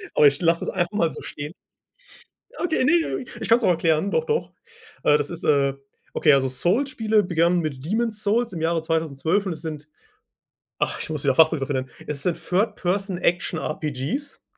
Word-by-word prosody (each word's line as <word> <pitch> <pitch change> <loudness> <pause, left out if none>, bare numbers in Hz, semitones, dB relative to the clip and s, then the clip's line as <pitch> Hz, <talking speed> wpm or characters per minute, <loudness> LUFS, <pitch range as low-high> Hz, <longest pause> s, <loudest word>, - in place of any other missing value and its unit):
Aber 150 - +7
ich 140 +4 +1
lasse 165 0 +2
es - - -2
einfach 175 -1 -1
mal 170 -6 +1
so - - -9
stehen. 145 +3 -7 1.0
Okay, 330 -6 0
ne, 330 -2 +2 0.2
ich - - -4
kann's 230 +1 +5
auch - - +4
erklären, 165 +2 +2
doch, 480 - +1
doch. 455 0 -1 0.5
Äh, 150 - +5
das 145 -1 -3
ist, 170 -1 -6
äh 140 -2 +3 0.4
okay, 150 - +4
also 135 -1 +3
Souls-Spiele 220 - +1
begannen 175 0 +2
mit 145 -4 -4
Demon's 220 +2 -1
Souls 225 +1 +1
im 165 - -5
Jahre 165 0 +1
2012 160 +4 0
und 185 - -2
es 155 - -8
sind 155 -2 -6 0.9
ach, - - -1
ich - - -5
muss 150 -3 -3
wieder 135 -2 +2
Fachbegriff 160 -4 +4
nennen, 130 -2 -2 0.2
es 145 -2 -2
sind 175 -2 0
Third 205 +4 0
Person 190 0 -1
Action 175 -2 0
RPGs. 155 - -3
170 Hz, 185 wpm, -23 LUFS, 150-205 Hz, 1.0 s, Aber